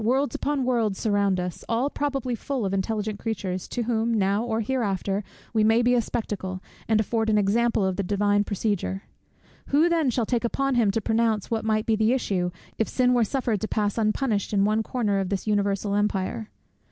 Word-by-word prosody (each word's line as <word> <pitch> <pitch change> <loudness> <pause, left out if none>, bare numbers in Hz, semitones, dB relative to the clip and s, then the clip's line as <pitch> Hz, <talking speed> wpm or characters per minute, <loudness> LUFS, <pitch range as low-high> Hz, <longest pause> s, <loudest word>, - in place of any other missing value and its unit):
Worlds 260 +3 +1
upon 285 -2 -1
worlds 230 -6 +1
surround 200 -3 +1
us, 180 -1 -4
all 235 +4 +1
probably 275 -4 -2
full 245 0 -3
of 195 - -1
intelligent 210 +1 -2
creatures, 190 -5 -3
to 240 - -2
whom, 230 0 0
now 200 +1 +1
or 225 -1 -1
hereafter, 205 -4 -1 0.3
we 220 -1 +3
may 225 +2 +4
be 245 +1 +3
a 245 - +4
spectacle, 190 -5 -4 0.3
and 220 -1 +3
afford 220 +1 0
an 215 - +3
example 215 +1 +2
of 190 -1 -1
the - - +1
Divine 205 +1 +2
procedure. 200 -2 -2 0.6
Who 305 +5 +4
then 325 -5 +2
shall 240 -1 0
take 240 +1 0
upon 275 +3 0
him 235 -4 +3
to 220 +3 0
pronounce 225 -1 0
what 225 -1 0
might 215 -1 +1
be 225 - +2
the 220 +2 +2
issue, 190 -8 0 0.3
if 220 - +1
sin 250 -1 +2
were 240 -2 +4
suffered 230 -2 -1
to 220 - -1
pass 205 -2 0
unpunished 215 -1 0
in 200 -1 +3
one 215 +1 +2
corner 215 -4 0
of 190 -2 -2
this 195 -2 -2
universal 200 -1 0
empire? 205 +1 -1
220 Hz, 200 wpm, -25 LUFS, 200-235 Hz, 0.6 s, may